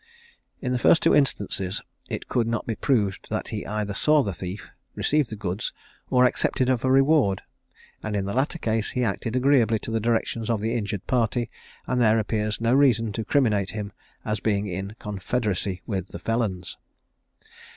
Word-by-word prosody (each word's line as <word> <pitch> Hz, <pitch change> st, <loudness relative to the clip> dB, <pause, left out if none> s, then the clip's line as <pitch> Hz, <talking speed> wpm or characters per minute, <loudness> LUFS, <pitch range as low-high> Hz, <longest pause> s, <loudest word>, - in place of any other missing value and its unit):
In 125 Hz, -, -2 dB
the 125 Hz, -, +1 dB
two -, -, -10 dB
first -, -, +5 dB
instances 100 Hz, -8 st, +2 dB, 0.3 s
it -, -, -4 dB
could 115 Hz, -2 st, +1 dB
not 115 Hz, -1 st, -1 dB
be 115 Hz, -, -1 dB
proved 105 Hz, -6 st, 0 dB
that -, -, -2 dB
he -, -, -4 dB
either 105 Hz, 0 st, -2 dB
saw 150 Hz, +7 st, +4 dB
the 100 Hz, -, -2 dB
thief, 90 Hz, +4 st, -7 dB, 0.2 s
received 150 Hz, -4 st, +1 dB
the 110 Hz, -, -5 dB
goods, 100 Hz, -1 st, -3 dB, 0.4 s
or 125 Hz, 0 st, +5 dB
accepted 130 Hz, +1 st, +2 dB
of 125 Hz, -2 st, 0 dB
a 130 Hz, -, +2 dB
reward; 135 Hz, -, +4 dB, 0.6 s
and 110 Hz, -1 st, -3 dB
in 100 Hz, -1 st, 0 dB
the 100 Hz, -, -3 dB
latter 135 Hz, +6 st, 0 dB
case 110 Hz, -6 st, -1 dB
he 125 Hz, -, +2 dB
acted 115 Hz, +2 st, -2 dB
agreeably 130 Hz, -4 st, +4 dB
to 115 Hz, -, -7 dB
the 115 Hz, -, +1 dB
directions 115 Hz, 0 st, -1 dB
of 115 Hz, -3 st, +1 dB
the 110 Hz, +2 st, -1 dB
injured 105 Hz, -4 st, -3 dB
party, 120 Hz, -1 st, 0 dB, 0.3 s
and 125 Hz, -1 st, 0 dB
there 110 Hz, -1 st, +5 dB
appeared 105 Hz, -1 st, -1 dB
no 115 Hz, +1 st, +2 dB
reason 120 Hz, -5 st, +4 dB
to 110 Hz, +2 st, -3 dB
criminate 105 Hz, -5 st, +2 dB
him 105 Hz, -1 st, -4 dB, 0.3 s
as 105 Hz, 0 st, -1 dB
being 105 Hz, -2 st, 0 dB
in 95 Hz, +2 st, -5 dB
confederacy 100 Hz, -2 st, -2 dB
with 95 Hz, -3 st, -3 dB
the -, -, -7 dB
felons. 105 Hz, -6 st, -2 dB
110 Hz, 180 wpm, -25 LUFS, 100-125 Hz, 0.6 s, first